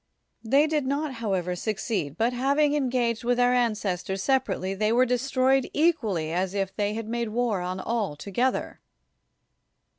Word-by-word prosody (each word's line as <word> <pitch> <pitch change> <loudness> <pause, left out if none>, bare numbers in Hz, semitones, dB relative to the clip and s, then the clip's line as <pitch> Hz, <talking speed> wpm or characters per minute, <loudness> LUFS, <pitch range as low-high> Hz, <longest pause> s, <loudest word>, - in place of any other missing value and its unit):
90 - - -11
ISOCRATES - - -8 0.2
They - - +1
did 280 -3 -1
not, 285 +1 -1
however, 190 -7 -2
succeed, 190 - -3
but 235 +2 +1
having 280 +4 +2
engaged 245 -5 0
with 245 +1 +1
our 245 0 +4
ancestors 200 -5 -1
separately, 260 -8 0
they 215 +2 0
were 250 +2 +4
destroyed 260 +1 +1
equally 230 - +1
as 185 +2 -1
if 195 -1 -2
they 205 0 -1
had 225 -1 -5
made 235 0 -2
war 225 -4 0
on 180 +1 -3
all 220 -9 -2
together. 240 - -2
230 Hz, 160 wpm, -26 LUFS, 195-255 Hz, 0.2 s, our